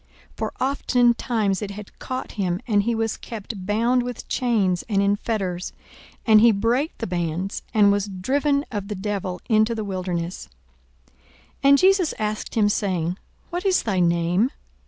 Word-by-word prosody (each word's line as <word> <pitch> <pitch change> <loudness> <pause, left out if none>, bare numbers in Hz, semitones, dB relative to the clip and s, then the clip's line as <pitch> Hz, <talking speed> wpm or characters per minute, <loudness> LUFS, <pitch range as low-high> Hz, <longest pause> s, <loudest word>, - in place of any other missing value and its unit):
For - - -3
oftentimes 240 -6 +1
it 205 - -4
had 200 0 -10
caught 255 0 -5
him: 185 -4 -1
and 205 -3 +3
he 235 +3 0
was 225 0 -1
kept 210 -4 -7
bound 235 +4 +2
with 245 -1 -6
chains 205 -8 +1
and 200 -2 +2
in 200 +1 +3
fetters; 195 -5 -3 0.5
and 215 -2 +7
he 235 0 +7
brake 235 +9 0
the 230 - -3
bands, 175 +1 -2
and 205 -2 +5
was 205 0 0
driven 280 +10 0
of 205 -3 -4
the 210 - -4
devil 190 -2 -3
into 220 +1 +3
the 220 - -3
wilderness.) 180 -3 -4 0.6
42:008:030 - - -33 0.5
And 280 - +8
Jesus 375 -1 +3
asked 215 0 -3
him, 215 -2 +4
saying, 185 -4 -1 0.3
What 355 +1 -3
is 385 -2 +2
thy 195 -5 0
name? 175 +6 +2
210 Hz, 160 wpm, -23 LUFS, 190-235 Hz, 0.6 s, And